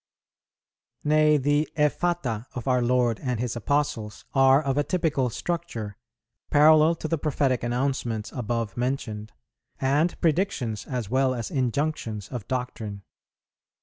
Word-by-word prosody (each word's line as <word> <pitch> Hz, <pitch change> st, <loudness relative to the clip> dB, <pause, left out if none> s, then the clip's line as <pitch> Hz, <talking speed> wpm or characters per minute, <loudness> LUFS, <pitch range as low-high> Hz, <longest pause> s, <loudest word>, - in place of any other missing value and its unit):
Nay, 150 Hz, 0 st, +4 dB
the 145 Hz, +2 st, +1 dB
effata 150 Hz, -6 st, 0 dB
of 125 Hz, 0 st, -5 dB
our 125 Hz, -1 st, +3 dB
Lord 120 Hz, -2 st, +2 dB
and 125 Hz, -4 st, -2 dB
His 120 Hz, -1 st, -2 dB
Apostles 115 Hz, -4 st, -1 dB
are 135 Hz, 0 st, +6 dB
of 135 Hz, -3 st, -1 dB
a 145 Hz, -, +2 dB
typical 150 Hz, -7 st, 0 dB
structure, 120 Hz, -, -4 dB, 0.5 s
parallel 155 Hz, +2 st, +6 dB
to 155 Hz, -, -5 dB
the 165 Hz, -1 st, -1 dB
prophetic 140 Hz, -4 st, 0 dB
announcements 120 Hz, -3 st, -2 dB
above 115 Hz, -3 st, -3 dB
mentioned, 120 Hz, -4 st, -3 dB, 0.5 s
and 145 Hz, +6 st, +1 dB
predictions 160 Hz, -, 0 dB
as 120 Hz, -6 st, -4 dB
well 130 Hz, 0 st, +2 dB
as 115 Hz, -2 st, -5 dB
injunctions 125 Hz, -5 st, -2 dB
of 120 Hz, -6 st, -6 dB
doctrine. 110 Hz, -6 st, -4 dB
130 Hz, 125 wpm, -26 LUFS, 115-150 Hz, 0.5 s, are